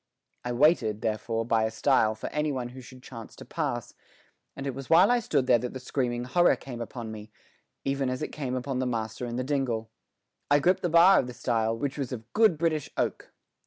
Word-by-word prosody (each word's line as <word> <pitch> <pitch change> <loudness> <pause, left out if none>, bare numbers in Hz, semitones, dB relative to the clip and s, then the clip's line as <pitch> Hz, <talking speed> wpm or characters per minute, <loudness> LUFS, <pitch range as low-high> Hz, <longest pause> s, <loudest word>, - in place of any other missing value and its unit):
I 125 - -3
waited, 120 -5 +3
therefore, 115 +1 -2
by 115 -1 +2
a - - 0
stile 110 -1 +2
for 110 - -9
any 150 0 0
one 125 -3 -3
who 130 +1 -10
should 130 0 -14
chance 115 -4 -10
to - - -11
pass, - - -3 0.6
and 140 - -6
it 135 - -2
was 135 +1 -8
while 175 +7 +6
I 245 - +4
stood 140 - 0
there 125 -2 +4
that 125 +1 -5
the - - -4
screaming 125 -2 -2
horror 175 +8 +3
came 120 -3 -8
upon 115 -1 -6
me, 110 0 -9 0.5
even 135 -1 0
as 130 +3 -3
it - - -3
came 130 -4 -4
upon 130 0 -2
the 130 - 0
master 110 0 -3
in 120 - -4
the 125 - -1
dingle. 125 -5 -2 0.6
I 145 - +6
gripped 180 +6 +2
the 175 - 0
bar 170 +4 +7
of 125 - -1
the 125 - -7
stile, 115 -3 0
which 140 +3 -3
was 135 -3 -3
of 115 -2 -8
good 215 -7 +4
British 155 -3 0
oak. - - -2
125 Hz, 225 wpm, -27 LUFS, 115-145 Hz, 0.6 s, bar